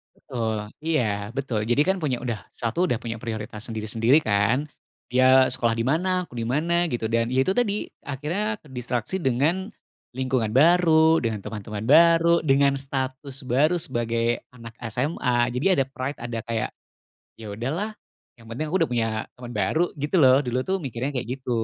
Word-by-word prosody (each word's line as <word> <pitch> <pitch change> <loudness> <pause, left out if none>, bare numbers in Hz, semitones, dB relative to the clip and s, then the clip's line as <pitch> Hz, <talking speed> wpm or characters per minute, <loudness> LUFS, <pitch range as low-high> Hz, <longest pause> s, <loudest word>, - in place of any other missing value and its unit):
Betul, 110 -3 -4 0.2
iya, 110 -9 -1
betul, 125 -5 -2
jadi, 120 +5 +2
kan, 190 - +2
punya 140 -8 -2
udah 115 -5 -4
satu 120 +10 -1
udah 120 -10 -1
punya 115 -1 -4
prioritas 110 -2 -5
sendiri-sendiri, 115 +5 +2
kan, 110 +6 +1 0.4
dia 130 +1 +5
sekolah 120 -2 +1
di 115 - -2
mana, 180 +8 +1
aku 120 - -10
di 115 - -2
mana, 170 +8 +1
gitu, 120 -8 -2
dan, 115 0 +1
ya, 130 - +3
itu 135 - 0
tadi 210 -4 0 0.2
akhirnya 175 +10 -3
terdistraksi 125 - -3
dengan 170 - 0 0.4
lingkungan 125 -4 -1
baru, 160 +1 +5
dengan 110 -6 -2
teman-teman 105 0 -6
baru, 170 +2 +5
dengan 140 0 +3
status 135 0 -4
baru 145 +7 +2
sebagai 120 -4 -1
anak 115 -2 -12 0.2
SMA, 125 -3 +1
jadi 125 +3 -3 0.2
ada - - 0
pride, 135 +1 -5
ada 120 -1 -4
kayak, 115 -2 -2 0.7
"Ya, 110 -2 -9
udah, 115 +6 -3
lah, 205 +6 -2 0.5
yang 115 - -16
penting 130 +7 -4
aku 190 - +1
udah - - -15
punya 115 -2 +1 0.3
teman 125 -1 -10
baru." 120 - 0
Gitu, 145 +5 -3
loh, 130 0 +7
dulu, 130 -2 -1
tuh, 190 +7 -1
mikirnya 135 -4 -4
kayak 125 -4 -3
gitu. 130 -1 -8
130 Hz, 170 wpm, -24 LUFS, 115-155 Hz, 0.7 s, loh